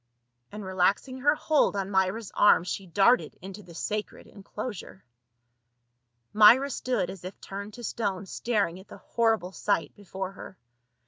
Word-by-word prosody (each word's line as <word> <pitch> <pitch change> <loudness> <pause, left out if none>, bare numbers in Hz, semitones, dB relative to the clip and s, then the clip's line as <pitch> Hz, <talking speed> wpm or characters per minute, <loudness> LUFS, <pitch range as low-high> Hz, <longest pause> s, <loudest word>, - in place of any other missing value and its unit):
And 210 -1 -7
relaxing 190 +8 0
her 290 +3 +3
hold 305 -7 +2
on 195 0 -3
Myra's 190 +3 0
arm 205 -5 +5
she 185 +1 -5
darted 205 +8 +3
into 195 +2 -9
the 170 -3 -14
sacred 210 +5 -4
enclosure. 205 -1 -8 1.3
Myra 235 +7 +7
stood 220 -9 -1
as 190 -2 -11
if 185 +2 -8
turned 200 +2 -8
to 240 - -10
stone 200 -5 -3
staring 200 -4 -1
at 190 - -15
the - - -11
hor 225 -1 +1
rible 180 0 -10
sight 205 +1 -1
before 190 -1 -6
her. 190 -1 -11
200 Hz, 150 wpm, -27 LUFS, 190-225 Hz, 1.3 s, Myra